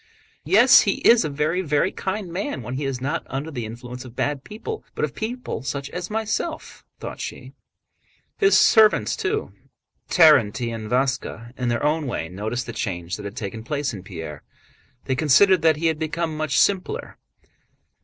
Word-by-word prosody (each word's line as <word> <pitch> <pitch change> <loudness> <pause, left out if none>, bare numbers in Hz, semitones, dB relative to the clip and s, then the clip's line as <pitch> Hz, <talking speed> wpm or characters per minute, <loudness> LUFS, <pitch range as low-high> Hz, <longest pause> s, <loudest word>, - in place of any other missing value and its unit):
"Yes, - - +7
he - - +1
is 235 -4 +7
a 155 - -2
very, 150 +5 0
very 150 +1 +1
kind 190 -2 -4
man 205 +11 -3
when 125 - -6
he 140 +2 -3
is 135 -2 -2
not 145 +6 -2
under 140 +4 -4
the 120 -6 -4
influence 125 +2 -8
of 125 -2 -12
bad 145 0 -1
people 330 - -7
but - - +1
of - - -9
people 240 - -4
such 140 +1 -4
as 180 0 -5
myself," 220 +9 -3 0.2
thought - - -7
she. - - -7 0.8
His 400 -1 +4
servants 220 -2 +5
too—Terénty 160 - +1
and 110 -1 -6
Váska—in 125 -1 -2
their 120 +2 -1
own 150 0 +1
way 80 -9 -3
noticed 110 +6 -3
the 115 - -7
change 90 -6 -3
that - - -9
had 100 +4 -7
taken 110 0 -5
place 140 +1 -2
in 100 - -7
Pierre. 80 -5 -8 0.6
They 130 - 0
considered 160 +7 +5
that 160 -1 +4
he 165 - -3
had 160 -2 +1
become 160 0 -2
much 155 -2 -1
"simpler." 200 - 0
145 Hz, 170 wpm, -23 LUFS, 120-180 Hz, 0.8 s, Yes